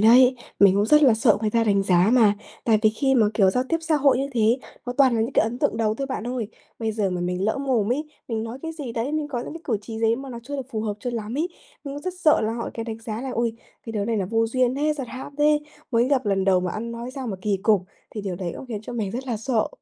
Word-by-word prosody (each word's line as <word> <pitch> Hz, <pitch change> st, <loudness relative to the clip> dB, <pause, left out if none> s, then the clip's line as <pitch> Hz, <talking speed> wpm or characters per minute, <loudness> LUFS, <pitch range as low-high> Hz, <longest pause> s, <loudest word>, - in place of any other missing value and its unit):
đấy, 250 Hz, +4 st, +7 dB, 0.2 s
mình 195 Hz, -1 st, +7 dB
cũng 205 Hz, +1 st, +2 dB
rất 300 Hz, +5 st, +6 dB
là 260 Hz, -6 st, +6 dB
sợ 220 Hz, -1 st, +4 dB
người 215 Hz, -1 st, 0 dB
ta 230 Hz, +1 st, +2 dB
đánh 200 Hz, -2 st, +3 dB
giá 185 Hz, +1 st, +4 dB
mà. 215 Hz, -5 st, +5 dB, 0.3 s
Tại 220 Hz, -2 st, +4 dB
vì 215 Hz, -, +5 dB
khi 270 Hz, +5 st, +1 dB
mà, 230 Hz, -4 st, +5 dB
kiểu, 195 Hz, -3 st, +4 dB
giao 250 Hz, +6 st, 0 dB
tiếp 330 Hz, -, +2 dB
xã 320 Hz, -1 st, +1 dB
hội 275 Hz, -3 st, +4 dB
như 275 Hz, -, 0 dB
thế, 230 Hz, +1 st, +3 dB, 0.3 s
nó 245 Hz, -, -2 dB
toàn 265 Hz, -3 st, +5 dB
là 225 Hz, -, +1 dB
những 230 Hz, +5 st, -1 dB
cái -, -, +4 dB
ấn 225 Hz, +3 st, -3 dB
tượng -, -, +1 dB
đầu 220 Hz, -1 st, +1 dB
thôi 275 Hz, +4 st, -3 dB
bạn 260 Hz, -4 st, -4 dB
ơi. 245 Hz, -4 st, -3 dB, 0.3 s
Bây 225 Hz, -1 st, -1 dB
giờ 210 Hz, -3 st, 0 dB
mà 180 Hz, -1 st, -2 dB
mình 180 Hz, +1 st, -1 dB
lỡ 220 Hz, +5 st, 0 dB
mồm 245 Hz, -5 st, +1 dB
ấy, 295 Hz, +5 st, -2 dB, 0.2 s
mình 225 Hz, -2 st, -2 dB
nói 230 Hz, +3 st, -6 dB
cái 325 Hz, -, -4 dB
gì 290 Hz, -7 st, -6 dB
đấy, 235 Hz, +6 st, -2 dB
mình 305 Hz, -1 st, -1 dB
có 260 Hz, -4 st, -3 dB
những 245 Hz, -, -6 dB
cái 325 Hz, -, -8 dB
cử 230 Hz, -, 0 dB
chỉ 220 Hz, +1 st, -7 dB
gì 225 Hz, -, +2 dB
ấy 225 Hz, -, +3 dB
mà 270 Hz, +2 st, -7 dB
nó 235 Hz, -, -6 dB
chưa 285 Hz, +4 st, -5 dB
được 265 Hz, -, -5 dB
phù 220 Hz, -4 st, -2 dB
hợp 215 Hz, -1 st, -2 dB
cho 245 Hz, -, -3 dB
lắm 225 Hz, 0 st, -4 dB
ấy, 335 Hz, +3 st, 0 dB, 0.4 s
nhưng 280 Hz, 0 st, -5 dB
rất 365 Hz, +3 st, -4 dB
sợ 310 Hz, -4 st, +5 dB
là 220 Hz, +1 st, 0 dB
họ 235 Hz, 0 st, -4 dB
cái 230 Hz, -, -4 dB
đánh 225 Hz, -1 st, -5 dB
giá 225 Hz, -1 st, -5 dB
là 265 Hz, 0 st, -4 dB
"Ôi, 235 Hz, 0 st, 0 dB, 0.3 s
cái 225 Hz, -, -5 dB
đứa 210 Hz, -2 st, -1 dB
này 225 Hz, +1 st, 0 dB
là 195 Hz, -, 0 dB
vô 225 Hz, +3 st, +1 dB
duyên 255 Hz, +2 st, +1 dB
thế, 300 Hz, +2 st, +1 dB
giật 270 Hz, -4 st, -5 dB
hãm 265 Hz, +3 st, -8 dB
thế, 300 Hz, 0 st, +4 dB, 0.3 s
mới 240 Hz, 0 st, +3 dB
gặp 265 Hz, -4 st, +1 dB
lần 195 Hz, -1 st, +1 dB
đầu 185 Hz, -1 st, +4 dB
mà 180 Hz, 0 st, -2 dB
ăn 235 Hz, +2 st, -4 dB
nói 235 Hz, +2 st, -6 dB
sao 265 Hz, -2 st, -5 dB
mà 205 Hz, -4 st, -3 dB
kỳ 205 Hz, -2 st, +1 dB
cục!" 210 Hz, -4 st, +4 dB, 0.3 s
Thì 215 Hz, -, -5 dB
điều 195 Hz, -3 st, -4 dB
đấy 175 Hz, -2 st, -4 dB
cũng -, -, -9 dB
khiến 220 Hz, -4 st, -5 dB
cho 245 Hz, -, -7 dB
mình 220 Hz, -5 st, -2 dB
rất 255 Hz, +5 st, -5 dB
là 240 Hz, -3 st, -1 dB
sợ. 225 Hz, 0 st, 0 dB
230 Hz, 310 wpm, -24 LUFS, 215-265 Hz, 0.4 s, đấy